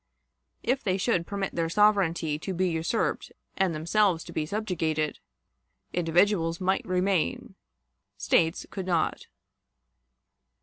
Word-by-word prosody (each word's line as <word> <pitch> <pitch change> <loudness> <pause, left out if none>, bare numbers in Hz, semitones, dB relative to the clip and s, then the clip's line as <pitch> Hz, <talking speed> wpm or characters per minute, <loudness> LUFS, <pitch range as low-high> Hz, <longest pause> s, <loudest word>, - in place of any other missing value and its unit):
If 260 +2 0
they 190 -3 +1
should 185 -4 0
permit 200 -2 -3
their 165 -1 -1
sovereignty 170 -6 +2
to 190 +3 -4
be 185 +2 +1
usurped 165 +7 -1 0.2
and 190 -4 +1
themselves 170 +2 +2
to - - -10
be 155 -1 -2
subjugated, 160 -7 -1 0.7
individuals 170 0 +2
might 190 +1 0
remain, 185 -1 0 0.6
States 165 0 +1
could 190 -2 -5
not. 170 -3 0
180 Hz, 115 wpm, -27 LUFS, 165-195 Hz, 0.7 s, sovereignty